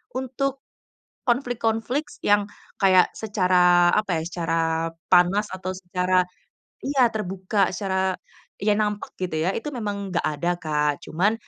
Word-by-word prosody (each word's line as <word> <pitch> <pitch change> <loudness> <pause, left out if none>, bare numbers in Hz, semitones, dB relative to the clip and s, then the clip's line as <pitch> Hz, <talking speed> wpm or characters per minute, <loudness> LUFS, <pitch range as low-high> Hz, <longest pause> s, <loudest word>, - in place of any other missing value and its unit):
untuk 265 +1 -2 0.6
konflik 245 +2 -1
yang 205 0 +3 0.3
kayak 185 -2 +6
secara 180 -4 +3
apa 195 -6 +1
ya, 160 - -4
secara 165 -2 -1 0.5
panas 185 +4 +4
atau 185 0 -4
secara 180 0 0 0.6
iya 265 -3 +3
terbuka, 195 -2 -1
secara 190 -1 0 0.5
ya 205 0 +2
nampak 210 -1 -1
gitu 175 -4 -2
ya, 175 - +1
itu 295 +5 -5
memang 200 -5 -4
nggak 180 - 0
ada, 175 +3 0
Kak. 150 -2 0
Cuman, 190 +7 +1
190 Hz, 125 wpm, -24 LUFS, 180-220 Hz, 0.6 s, kayak